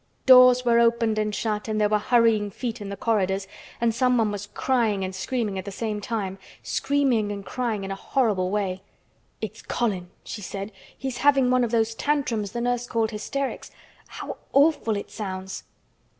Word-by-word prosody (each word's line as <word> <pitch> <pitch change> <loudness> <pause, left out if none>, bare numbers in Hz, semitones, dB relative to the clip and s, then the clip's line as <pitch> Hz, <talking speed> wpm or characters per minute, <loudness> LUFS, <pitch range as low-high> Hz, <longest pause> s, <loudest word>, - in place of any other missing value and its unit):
Doors 255 -1 +8
were 235 -1 +4
opened 230 -2 +2
and 215 0 0
shut 210 -1 -2
and 215 -1 -1
there 210 - +4
were 210 0 +2
hurrying 225 -2 +3
feet 235 +2 -5
in 200 - -5
the 200 - -5
corridors 195 -3 0 0.3
and 235 -1 +2
someone 240 -2 +2
was 205 0 -5
crying 225 -5 0
and 190 0 -3
screaming 205 0 -2
at 190 - -7
the 200 - -5
same 210 0 -3
time, 195 -3 -3 0.2
screaming 260 -7 +1
and 200 -1 -6
crying 225 -2 -2
in 195 - -5
a - - -2
horrible 200 -4 0
way. 190 -2 -1 0.6
"It's - - -5
Colin," 195 -7 -2
she 210 - -7
said. 200 +2 -5 0.3
"He's 265 -2 -4
having 275 -3 +4
one 255 0 +3
of 235 - 0
those 225 -1 +1
tantrums 235 -7 -1
the 240 - -2
nurse 245 0 -1
called 225 -2 0
hysterics. 265 +6 -4 0.4
How - - -7 0.2
awful 275 -7 +3
it 200 - -7
sounds." 190 -3 -6
220 Hz, 180 wpm, -25 LUFS, 200-245 Hz, 0.6 s, Doors